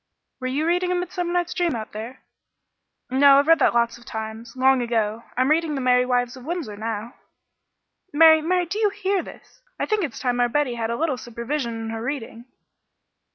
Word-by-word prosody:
"Were 255 Hz, -, -3 dB
you 280 Hz, +5 st, -1 dB
reading 360 Hz, +1 st, +1 dB
'Midsummer 355 Hz, -1 st, -3 dB
Night's 350 Hz, -1 st, 0 dB
Dream' 345 Hz, -6 st, 0 dB
out 220 Hz, -1 st, -6 dB
there?" 225 Hz, +5 st, -8 dB, 0.9 s
"No, 275 Hz, +1 st, +6 dB
I've 285 Hz, -, +4 dB
read 330 Hz, 0 st, +5 dB
that 255 Hz, -, +3 dB
lots 235 Hz, 0 st, +1 dB
of 240 Hz, -, -18 dB
times 220 Hz, +2 st, -7 dB
long 260 Hz, 0 st, +3 dB
ago. 225 Hz, -2 st, -1 dB
I'm 255 Hz, +3 st, +2 dB
reading 315 Hz, -1 st, +1 dB
'The 270 Hz, -, -2 dB
Merry 250 Hz, 0 st, +3 dB
Wives 245 Hz, 0 st, 0 dB
of 255 Hz, -, -12 dB
Windsor' 320 Hz, -8 st, -4 dB
now." 220 Hz, +2 st, -5 dB, 1.0 s
"Mary, 315 Hz, +1 st, +7 dB
Mary, 355 Hz, +2 st, +1 dB
do 375 Hz, +6 st, -4 dB
you 425 Hz, -2 st, +3 dB
hear 390 Hz, -1 st, -1 dB
this? -, -, -14 dB, 0.2 s
I -, -, 0 dB
think 430 Hz, -2 st, 0 dB
it's 285 Hz, -8 st, -4 dB
time 245 Hz, -1 st, -1 dB
our 245 Hz, 0 st, +3 dB
Betty 285 Hz, -1 st, 0 dB
had 230 Hz, -1 st, -3 dB
a 235 Hz, -, -1 dB
little 310 Hz, -5 st, 0 dB
supervision 235 Hz, +1 st, -4 dB
in 225 Hz, 0 st, -5 dB
her 225 Hz, 0 st, -5 dB
reading." 240 Hz, -2 st, -5 dB
260 Hz, 200 wpm, -23 LUFS, 235-330 Hz, 1.0 s, Mary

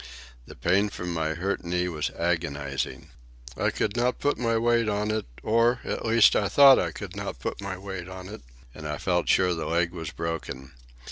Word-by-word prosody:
The -, -, -11 dB
pain 100 Hz, +3 st, +2 dB
from 90 Hz, -3 st, -5 dB
my 80 Hz, -1 st, -1 dB
hurt 95 Hz, +4 st, -2 dB
knee 90 Hz, +1 st, -1 dB
was 80 Hz, -4 st, -2 dB
agonizing. 75 Hz, -5 st, -2 dB, 0.4 s
I -, -, +1 dB
could 100 Hz, -, -2 dB
not 120 Hz, +1 st, +1 dB
put 145 Hz, -, 0 dB
my 115 Hz, -2 st, +1 dB
weight 115 Hz, -1 st, +2 dB
on 105 Hz, +1 st, 0 dB
it, 110 Hz, -1 st, -2 dB, 0.2 s
or, 115 Hz, +3 st, +3 dB
at -, -, -3 dB
least, 115 Hz, -1 st, +6 dB
I 100 Hz, -, +1 dB
thought 140 Hz, -2 st, +8 dB
I -, -, 0 dB
could -, -, -8 dB
not -, -, -5 dB
put 60 Hz, -, -5 dB
my 95 Hz, -1 st, -4 dB
weight 95 Hz, -2 st, -7 dB
on 95 Hz, 0 st, -8 dB
it; 110 Hz, +3 st, -9 dB, 0.3 s
and 75 Hz, -1 st, -8 dB
I 75 Hz, 0 st, -3 dB
felt 90 Hz, -2 st, 0 dB
sure 90 Hz, -1 st, +4 dB
the 80 Hz, -2 st, -4 dB
leg 85 Hz, 0 st, +1 dB
was 80 Hz, -3 st, -6 dB
broken. 75 Hz, -5 st, -5 dB
90 Hz, 200 wpm, -26 LUFS, 85-110 Hz, 0.4 s, thought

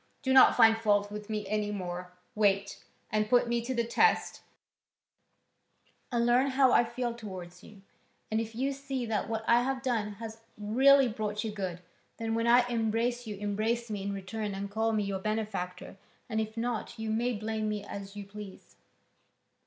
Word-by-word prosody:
Do 260 Hz, -1 st, +2 dB
not 265 Hz, -, +8 dB
find 225 Hz, -2 st, +7 dB
fault 205 Hz, -2 st, +2 dB
with 210 Hz, 0 st, -7 dB
me 210 Hz, -2 st, -3 dB
any 210 Hz, 0 st, -1 dB
more, 180 Hz, -3 st, -5 dB, 0.2 s
wait, 200 Hz, -2 st, +1 dB, 0.3 s
and 215 Hz, 0 st, +1 dB
put 245 Hz, 0 st, +4 dB
me 235 Hz, 0 st, 0 dB
to 255 Hz, +3 st, -3 dB
the 235 Hz, -, +1 dB
test, 435 Hz, -, +2 dB, 1.7 s
and 235 Hz, -1 st, +1 dB
learn 245 Hz, +3 st, +4 dB
how 265 Hz, -1 st, +4 dB
I -, -, +6 dB
feel 240 Hz, 0 st, -3 dB
towards 185 Hz, -6 st, -9 dB
you, 200 Hz, -2 st, -15 dB, 0.5 s
and 220 Hz, +1 st, +1 dB
if 225 Hz, 0 st, -7 dB
you 265 Hz, +4 st, 0 dB
see 270 Hz, -2 st, -4 dB
that 220 Hz, -2 st, -2 dB
what 220 Hz, -1 st, -2 dB
I 235 Hz, +1 st, +5 dB
have 260 Hz, +1 st, -2 dB
done 225 Hz, -5 st, -1 dB
has 225 Hz, +1 st, -8 dB, 0.2 s
really 260 Hz, +6 st, +5 dB
brought 210 Hz, -2 st, -3 dB
you 220 Hz, -, -3 dB
good, 185 Hz, -4 st, -4 dB, 0.4 s
then, 225 Hz, 0 st, -2 dB
when 230 Hz, +1 st, 0 dB
I 245 Hz, +1 st, +5 dB
embrace 235 Hz, +1 st, -1 dB
you, 210 Hz, -, -4 dB
embrace 215 Hz, +3 st, -1 dB
me 205 Hz, -2 st, -3 dB
in 200 Hz, +1 st, -3 dB
return 200 Hz, +1 st, -4 dB
and 200 Hz, +1 st, -5 dB
call 220 Hz, +2 st, +1 dB
me 215 Hz, -1 st, +1 dB
your 195 Hz, -1 st, -2 dB
benefactor, 195 Hz, -4 st, -4 dB, 0.3 s
and 220 Hz, -2 st, -1 dB
if 220 Hz, +1 st, -5 dB
not, 240 Hz, 0 st, -3 dB
you 220 Hz, 0 st, -3 dB
may 240 Hz, +3 st, 0 dB
blame 215 Hz, 0 st, -2 dB
me 210 Hz, -1 st, -3 dB
as 200 Hz, 0 st, -8 dB
you 205 Hz, -1 st, -6 dB
please." 200 Hz, -1 st, -11 dB
220 Hz, 185 wpm, -30 LUFS, 205-235 Hz, 1.7 s, not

